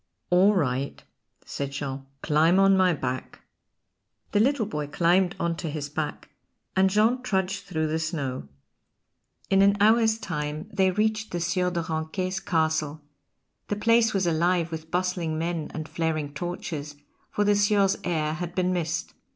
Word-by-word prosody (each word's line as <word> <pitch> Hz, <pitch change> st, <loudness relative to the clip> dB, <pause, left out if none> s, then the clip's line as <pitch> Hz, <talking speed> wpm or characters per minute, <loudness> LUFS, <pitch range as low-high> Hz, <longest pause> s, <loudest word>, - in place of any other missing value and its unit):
"All 190 Hz, +4 st, +5 dB
right," 140 Hz, -5 st, -1 dB, 0.4 s
said 140 Hz, -1 st, -4 dB
Jean, 135 Hz, -1 st, -5 dB, 0.2 s
"climb 160 Hz, +4 st, +4 dB
on 195 Hz, 0 st, +5 dB
my 185 Hz, -1 st, +4 dB
back." 130 Hz, -5 st, -4 dB, 0.9 s
The 205 Hz, -, +2 dB
little 255 Hz, +1 st, +2 dB
boy 150 Hz, -8 st, -4 dB
climbed 175 Hz, +5 st, +2 dB
on 170 Hz, 0 st, 0 dB
to 165 Hz, -, -4 dB
his 145 Hz, -1 st, -4 dB
back, 150 Hz, +1 st, -4 dB, 0.5 s
and 190 Hz, 0 st, +4 dB
Jean 220 Hz, +6 st, +2 dB
trudged 195 Hz, -4 st, -1 dB
through 160 Hz, -5 st, -1 dB
the 155 Hz, +1 st, -1 dB
snow. 145 Hz, -, -3 dB, 1.0 s
In 195 Hz, 0 st, +5 dB
an 200 Hz, +1 st, +5 dB
hour's 220 Hz, +1 st, +4 dB
time 150 Hz, -3 st, -4 dB
they 190 Hz, -1 st, +3 dB
reached 215 Hz, +3 st, 0 dB
the 175 Hz, -, -3 dB
Sieur 180 Hz, +2 st, 0 dB
de 170 Hz, -1 st, -2 dB
Ranquet's 175 Hz, +4 st, -2 dB
castle; 160 Hz, -4 st, 0 dB, 0.7 s
the 205 Hz, -, -1 dB
place 230 Hz, +1 st, +3 dB
was 195 Hz, -3 st, 0 dB
alive 170 Hz, 0 st, +1 dB
with 160 Hz, 0 st, -6 dB
bustling 180 Hz, -2 st, -1 dB
men 165 Hz, -1 st, -2 dB
and 155 Hz, -1 st, -5 dB
flaring 155 Hz, -3 st, -2 dB
torches, 150 Hz, -2 st, -5 dB, 0.3 s
for 205 Hz, -, 0 dB
the 205 Hz, 0 st, +3 dB
Sieur's 205 Hz, -1 st, +3 dB
heir 155 Hz, -3 st, 0 dB
had 175 Hz, +1 st, -5 dB
been 185 Hz, 0 st, +1 dB
missed. 165 Hz, -1 st, -2 dB
175 Hz, 155 wpm, -26 LUFS, 155-195 Hz, 1.0 s, All